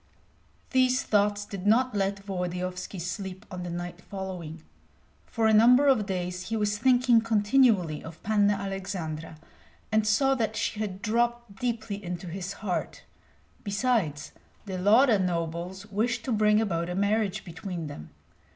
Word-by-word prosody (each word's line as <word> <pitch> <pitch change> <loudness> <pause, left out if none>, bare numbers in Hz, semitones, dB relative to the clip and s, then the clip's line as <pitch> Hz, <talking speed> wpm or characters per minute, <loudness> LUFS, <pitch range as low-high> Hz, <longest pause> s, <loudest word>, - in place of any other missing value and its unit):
These 255 -1 +3
thoughts 205 0 +1
did 200 -1 -6
not 250 +3 +4
let 195 -1 -1
Volodyovski 180 0 -4
sleep 185 +2 -5
on 180 -1 -5
the 175 - -5
night 175 +1 -6
following. 180 -5 -7 0.6
For 225 -2 -1
a 220 - +5
number 245 +6 +6
of 250 -8 +3
days 180 -1 -3
he 225 - -1
was 205 -1 0
thinking 245 -1 +4
continually 210 - +2
of 160 0 -11
Panna 205 -1 +3
Aleksandra, 180 -5 -5 0.5
and 215 0 +2
saw 270 +6 +3
that 220 -4 -1
she 215 - -2
had 200 -3 -4
dropped 235 -1 0
deeply 225 -4 -3
into 175 0 -5
his 180 +2 -5
heart. 180 -3 -3 0.6
Besides, 200 - 0 0.3
the 190 -2 -4
Lauda 220 +4 +5
nobles 175 +1 -3
wished 230 +3 -1
to 260 - -2
bring 210 -1 +4
about 170 -6 -1
a 180 - -3
marriage 205 0 0
between 175 -1 -6
them. 145 - -8
200 Hz, 145 wpm, -27 LUFS, 180-220 Hz, 0.6 s, number